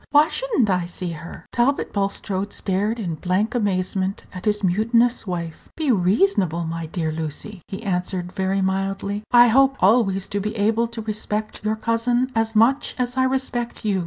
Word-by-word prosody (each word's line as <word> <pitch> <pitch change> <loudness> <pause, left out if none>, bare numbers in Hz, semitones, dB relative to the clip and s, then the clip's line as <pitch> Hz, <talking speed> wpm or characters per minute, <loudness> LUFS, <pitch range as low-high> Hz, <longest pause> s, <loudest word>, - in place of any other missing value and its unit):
Why 295 +2 +5
should - - -3
n't 230 - +4
I 180 -3 0
see 175 0 -5
her?" 165 +1 -9
Talbot 255 +4 +1
Bulstrode 200 0 -2
stared 205 +4 -1
in 180 -6 -2
blank 195 +6 0
amazement 190 -3 -1
at 185 - -7
his 210 -1 +1
mutinous 230 +5 +2
wife. 170 -3 -5
"Be 310 -4 +1
reasonable, 185 - +2
my 165 0 -4
dear 160 -1 -2
Lucy," 160 +5 -5
he 195 +3 -7
answered 180 -2 -2
very 190 0 0
mildly; 195 +2 -1
"I 240 -1 +7
hope 270 +3 +4
always 195 -2 +3
to 205 - -1
be 210 +2 -3
able 225 +2 +2
to 230 -1 -7
respect 215 0 -3
your 215 +1 0
cousin 240 +3 0
as 225 0 0
much 240 +6 +3
as 250 0 -2
I 260 0 +3
respect 260 -3 -2
you. 200 -3 +1
210 Hz, 175 wpm, -22 LUFS, 185-235 Hz, -, I